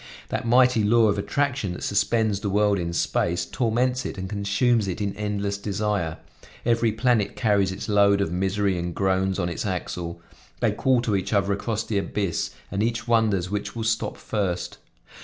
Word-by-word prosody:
That -, -, -2 dB
mighty 125 Hz, -1 st, +4 dB
law 110 Hz, +1 st, +4 dB
of 100 Hz, -, 0 dB
attraction 130 Hz, -4 st, -1 dB
that -, -, -7 dB
suspends 105 Hz, 0 st, +1 dB
the 100 Hz, -, -2 dB
world 105 Hz, 0 st, +2 dB
in 85 Hz, -1 st, -2 dB
space, 85 Hz, 0 st, 0 dB
torments 125 Hz, +2 st, 0 dB
it -, -, -5 dB
and 95 Hz, 0 st, -4 dB
consumes 100 Hz, +3 st, +1 dB
it 95 Hz, +2 st, -3 dB
in 100 Hz, -2 st, -2 dB
endless 100 Hz, -1 st, -2 dB
desire; 100 Hz, -5 st, -1 dB, 0.5 s
every 115 Hz, -1 st, +2 dB
planet 110 Hz, -2 st, +1 dB
carries 100 Hz, -4 st, +2 dB
its 95 Hz, -, -6 dB
load 100 Hz, -1 st, +4 dB
of 100 Hz, -5 st, 0 dB
misery 95 Hz, +1 st, 0 dB
and 85 Hz, 0 st, -4 dB
groans 95 Hz, -1 st, +1 dB
on 90 Hz, -3 st, 0 dB
its 85 Hz, -, -3 dB
axle; 90 Hz, -3 st, -4 dB, 0.4 s
they -, -, +2 dB
call 130 Hz, -2 st, +2 dB
to 110 Hz, -4 st, +1 dB
each 95 Hz, +3 st, -2 dB
other 100 Hz, -1 st, +2 dB
across 110 Hz, +2 st, -2 dB
the 105 Hz, -3 st, -1 dB
abyss 100 Hz, -2 st, -2 dB, 0.2 s
and 100 Hz, 0 st, -1 dB
each 115 Hz, +2 st, -1 dB
wonders 105 Hz, -6 st, +2 dB
which 105 Hz, +1 st, -3 dB
will 115 Hz, -, -3 dB
stop 110 Hz, 0 st, -1 dB
first. 90 Hz, -5 st, -3 dB
100 Hz, 180 wpm, -24 LUFS, 95-110 Hz, 0.5 s, mighty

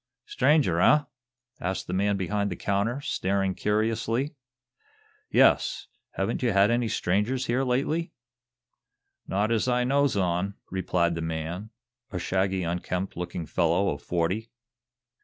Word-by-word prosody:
"Stranger, 150 Hz, -, +2 dB
eh?" 150 Hz, +8 st, +5 dB, 0.6 s
asked 95 Hz, +2 st, -2 dB
the -, -, -5 dB
man 100 Hz, +1 st, +1 dB
behind 100 Hz, +2 st, -1 dB
the 90 Hz, -, -4 dB
counter, 105 Hz, +9 st, -1 dB
staring 95 Hz, -6 st, 0 dB
curiously. 115 Hz, +7 st, 0 dB, 1.0 s
"Yes; -, -, +3 dB, 0.3 s
haven't 95 Hz, +4 st, -2 dB
you 120 Hz, -4 st, +1 dB
had 100 Hz, +3 st, +5 dB
any 120 Hz, 0 st, +1 dB
other -, -, -4 dB
strangers 105 Hz, +9 st, 0 dB
here 125 Hz, +3 st, +1 dB
lately?" 150 Hz, +7 st, 0 dB, 1.2 s
"Not 105 Hz, +4 st, 0 dB
as 115 Hz, +1 st, +1 dB
I 125 Hz, 0 st, +2 dB
knows 140 Hz, -1 st, +2 dB
on," 95 Hz, +1 st, 0 dB, 0.2 s
replied 90 Hz, -2 st, +1 dB
the 85 Hz, -, -3 dB
man, 80 Hz, +5 st, -4 dB, 0.4 s
a 95 Hz, -, -4 dB
shaggy, 95 Hz, +1 st, 0 dB
unkempt 90 Hz, +2 st, -3 dB
looking 85 Hz, -1 st, -4 dB
fellow 85 Hz, +4 st, +1 dB
of 70 Hz, -, -4 dB
forty. 90 Hz, +6 st, -1 dB
100 Hz, 135 wpm, -27 LUFS, 90-120 Hz, 1.2 s, eh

